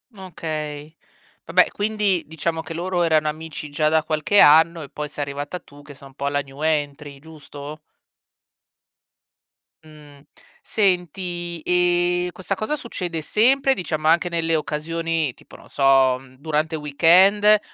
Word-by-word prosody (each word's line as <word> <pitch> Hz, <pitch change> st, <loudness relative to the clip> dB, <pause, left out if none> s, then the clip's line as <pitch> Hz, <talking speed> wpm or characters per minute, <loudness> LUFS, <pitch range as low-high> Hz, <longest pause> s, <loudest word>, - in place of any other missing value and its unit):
Okay, 155 Hz, -4 st, -6 dB, 0.5 s
vabbè, -, -, +3 dB
quindi 205 Hz, -4 st, +1 dB
diciamo 160 Hz, +1 st, -3 dB
che 165 Hz, -, -8 dB
loro 175 Hz, +1 st, -1 dB
erano 155 Hz, -2 st, +2 dB
amici 155 Hz, -1 st, -6 dB
già 155 Hz, +1 st, +1 dB
da 160 Hz, 0 st, +2 dB
qualche 155 Hz, +6 st, +1 dB
anno 160 Hz, +2 st, +6 dB
e 140 Hz, -, -9 dB
poi 150 Hz, -1 st, -6 dB
sei 145 Hz, -1 st, -4 dB
arrivata 145 Hz, +5 st, -6 dB
tu 145 Hz, 0 st, -17 dB
che 145 Hz, -1 st, -13 dB
sei 140 Hz, -, -14 dB
un 135 Hz, -, -18 dB
po' 140 Hz, +1 st, -2 dB
la 145 Hz, -, 0 dB
new 140 Hz, 0 st, -9 dB
entry, 145 Hz, -2 st, -2 dB
giusto? 150 Hz, -1 st, -11 dB, 2.0 s
Mh, 150 Hz, -2 st, -16 dB, 0.4 s
senti 175 Hz, -3 st, -2 dB
e 175 Hz, 0 st, +1 dB
questa 190 Hz, +1 st, -4 dB
cosa 215 Hz, +10 st, -2 dB
succede 180 Hz, -, -5 dB
sempre, 265 Hz, -, +2 dB
diciamo 155 Hz, -4 st, -3 dB
anche 170 Hz, +2 st, +3 dB
nelle 165 Hz, -1 st, -1 dB
occasioni, 160 Hz, -1 st, -2 dB
tipo -, -, -17 dB
non -, -, -16 dB
so, 135 Hz, -2 st, +3 dB, 0.2 s
durante 155 Hz, +1 st, -1 dB
il 155 Hz, -, -6 dB
weekend 190 Hz, +8 st, +5 dB
160 Hz, 140 wpm, -22 LUFS, 150-175 Hz, 2.0 s, anno